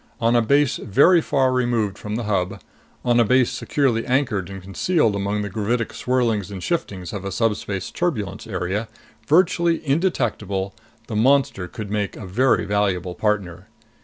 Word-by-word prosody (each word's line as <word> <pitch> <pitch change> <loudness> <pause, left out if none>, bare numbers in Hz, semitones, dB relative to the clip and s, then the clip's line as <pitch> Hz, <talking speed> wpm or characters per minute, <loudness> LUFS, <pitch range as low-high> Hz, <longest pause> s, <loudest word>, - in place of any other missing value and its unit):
On 115 +1 +2
a 120 - +5
base 140 +3 +2
very 165 - +4
far 135 -4 +1
removed 120 -5 0
from 105 +1 -5
the 120 - -2
Hub, 100 -1 -1 0.5
on 120 -1 +3
a - - +6
base 125 +2 +3
securely 125 -6 0
anchored 125 -8 0
and 95 0 -7
concealed 105 - 0
among 100 +1 -1
the 100 - -4
gravitic 110 +3 -1
swirlings 115 -6 0
and 95 -2 -7
shiftings 100 - -3
of 100 -2 -5
a 100 - -4
subspace 105 -3 -1
turbulence 105 - -2
area, 95 +2 -2 0.4
virtually 170 0 +3
indetectable, 115 - -1 0.3
the 110 - -6
monster 120 -5 +2
could 105 -1 -7
make 105 -1 -2
a 110 - -7
very 120 +7 +2
valuable 95 -3 0
partner. 100 -5 -2
110 Hz, 160 wpm, -22 LUFS, 100-130 Hz, 0.5 s, a